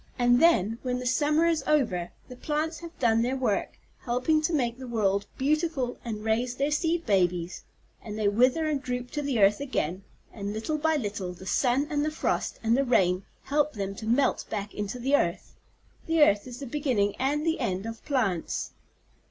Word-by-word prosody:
"And 245 0 +4
then, 230 - +4
when 250 -1 -1
the 250 - -5
summer 300 +5 +2
is 330 -2 +1
over, 220 - +1 0.2
the 250 - -10
plants 305 +4 -2
have 340 0 -10
done 230 -2 +3
their 250 +3 0
work, 250 -6 -1 0.2
helping 255 +6 +1
to 310 - 0
make 250 -6 0
the 260 - -7
world 200 -3 0
beautiful 290 -3 0
and 215 -3 -5
raise 240 +3 0
their 280 +3 0
seed 330 +2 0
babies, 180 -4 0 0.4
and 215 -1 -7
they 215 -1 +1
wither 250 +9 +3
and 300 -3 0
droop 250 -1 -4
to 295 - -2
the 280 -4 -1
earth 200 +1 +5
again, 195 - -2 0.3
and 200 -1 -4
little 300 +9 -2
by 320 +1 +2
little 205 -8 -3
the 185 +1 -12
sun 255 +7 +2
and 290 -1 +1
the 305 - +1
frost 310 - -2
and 225 +1 +3
the 275 - +2
rain 185 -7 +2 0.2
help 295 +1 +1
them 195 -2 -3
to 220 +2 -8
melt 245 +5 +2
back 205 -1 -4
into 210 +3 -4
the 265 +4 +2
earth. 170 -10 -1 0.5
The 325 -1 +5
earth 205 -4 +3
is 245 0 -8
the 280 - -6
beginning 240 -7 0
and 290 +4 0
the 325 0 +1
end 195 -5 -2
of 225 0 -7
plants." 220 - -1
250 Hz, 195 wpm, -27 LUFS, 210-295 Hz, 0.5 s, earth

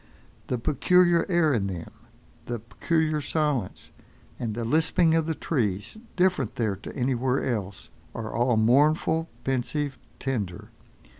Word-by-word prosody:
The 125 - -1
peculiar 175 +7 +3
air 170 -4 +3
in 100 -5 0
them, 90 -4 -6 0.6
the 120 - -2
peculiar 155 +7 -1
silence, 145 - -1 0.5
and 110 -3 -3
the 115 0 -3
lisping 160 +5 +3
of 165 -1 +2
the 160 - -1
trees 105 - -2 0.2
different 180 - +1
there 110 -4 0
to - - -9
anywhere 130 0 0
else, 100 -7 -3 0.3
are 115 -1 -5
all 120 0 +2
mournful, 155 +7 +3
pensive, 135 +2 -2 0.2
tender. 105 -10 -4
130 Hz, 130 wpm, -26 LUFS, 115-160 Hz, 0.6 s, peculiar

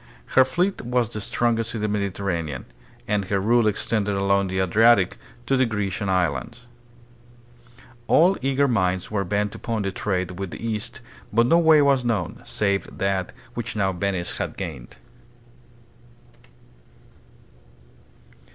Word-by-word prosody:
Her 130 - +7
fleet 175 +10 -1
was 120 -2 0
the 110 -2 -5
strongest 115 +1 0
on 110 - -3
the 105 - 0
Mediterranean, 95 -8 -2 0.4
and 105 -2 0
her 100 +1 0
rule 115 +3 +3
extended 105 -1 0
along 100 0 +2
the 95 0 -3
Adriatic 100 +1 +4 0.3
to 135 - +2
the 130 -1 +3
Grecian 105 -2 -2
islands. 90 - -1 1.4
All 180 +4 +5
eager 135 +1 +2
minds 95 -6 0
were 100 -2 0
bent 100 +2 -1
upon 115 -3 -3
the 100 - -2
trade 90 -2 -2
with 95 -1 -3
the 115 - -6
East, 110 +3 -3 0.3
but 115 +2 +4
no 165 +7 +4
way 160 -3 +6
was 135 -3 +3
known, 105 -6 -2
save 100 -2 -1
that 95 -2 -1 0.2
which 120 -1 -4
now 100 -2 +1
Venice 90 -1 -2
had - - -4
gained. 80 -11 -7
105 Hz, 135 wpm, -23 LUFS, 95-120 Hz, 1.4 s, Her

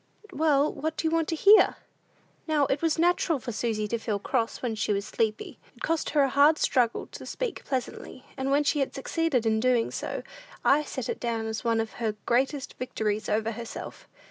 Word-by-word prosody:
"Well, 295 -1 +2
what 315 +1 -3
do - - -2
you - - 0
want 330 -1 +1
to 330 - -1
hear?" 405 +6 +6 0.7
Now, 300 -2 +3
it 270 +1 -1
was 325 -2 +1
natural 340 -1 +2
for 240 -1 -6
Susy 215 -2 -1
to 235 - -1
feel 215 -2 -2
cross 230 +4 -2
when 240 -3 -1
she 210 -1 -1
was 200 0 -2
sleepy. 220 -1 -2 0.2
It - - -12
cost 330 -1 0
her 290 -1 +3
a 270 - +2
hard 285 +4 +5
struggle 245 -6 +1
to - - -9
speak 485 -6 -4
pleasantly, 255 0 -5
and 265 0 -2
when 285 +2 +3
she 290 0 +2
succeeded 275 -3 -1
in 220 0 +2
doing 245 -1 +2
so, - - -4 0.4
I 290 +2 +5
set 260 -3 -5
it - - -3
down 230 -2 -2
as 220 +1 -4
one 230 -1 +1
of 225 0 -2
her 220 -2 0
greatest 270 +3 0
victories 215 -4 -2
over 220 +1 0
herself. 230 0 -8
255 Hz, 200 wpm, -27 LUFS, 225-300 Hz, 0.7 s, hear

